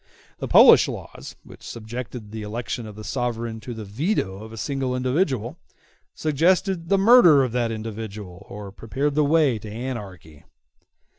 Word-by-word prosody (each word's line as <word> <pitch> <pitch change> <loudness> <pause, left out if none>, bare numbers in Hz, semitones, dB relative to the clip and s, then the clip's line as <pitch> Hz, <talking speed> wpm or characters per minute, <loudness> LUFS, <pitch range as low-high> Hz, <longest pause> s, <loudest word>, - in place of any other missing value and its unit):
The - - -4
Polish - - +7
laws, - - -8
which - - -15
subjected 115 -1 -7
the 110 0 -6
election 110 +2 -5
of 105 - -10
the 110 - -9
sovereign 115 -2 -3
to 115 +2 -8
the 110 -1 -7
veto 105 - -2
of 110 - -10
a 115 - -10
single 135 +1 -2
individual, 130 - -1 0.6
suggested 170 +3 +1
the 195 - +4
murder 195 - +7
of 125 - -2
that 120 -1 -1
individual 110 -4 -7
or 100 -1 -8
prepared 135 +8 -2
the 150 +1 +2
way 145 -6 +3
to 105 - -9
anarchy. 105 - -7
120 Hz, 155 wpm, -23 LUFS, 110-140 Hz, 0.6 s, Polish